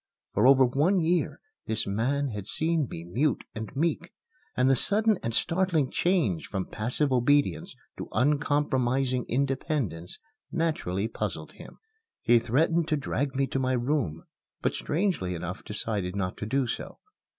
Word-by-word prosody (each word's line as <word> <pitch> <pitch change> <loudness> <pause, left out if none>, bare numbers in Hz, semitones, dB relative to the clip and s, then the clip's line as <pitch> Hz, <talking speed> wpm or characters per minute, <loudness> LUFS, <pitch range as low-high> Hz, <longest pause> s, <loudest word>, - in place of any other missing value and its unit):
For - - +4
over 135 -1 +7
one 150 +10 +2
year 170 +2 0 0.3
this 110 -1 0
man 130 +8 0
had 105 -3 -6
seen 160 +6 0
me 80 - -7
mute 120 - 0
and 110 0 -5
meek, 165 +3 -1 0.5
and 125 - +4
the 135 - +5
sudden 210 - +3
and 115 - -2
startling 165 +1 +1
change 165 - +1
from 95 -2 -3
passive 125 +6 0
obedience 145 +7 +2 0.2
to - - -5
uncompromising 130 -2 +1
independence 130 - -2 0.3
naturally 155 - -1
puzzled - - -4
him. - - -13 0.5
He 120 0 +5
threatened 155 +8 +1
to 155 - +1
drag 140 0 -2
me 135 0 +2
to 135 +1 -2
my 130 0 +1
room, 120 - -1 0.4
but - - +1
strangely 150 - -1
enough 90 +2 -5
decided 105 -4 -3
not 90 -2 -2
to 105 - -5
do 135 +3 +1
so. - - -5
130 Hz, 150 wpm, -27 LUFS, 110-155 Hz, 0.5 s, over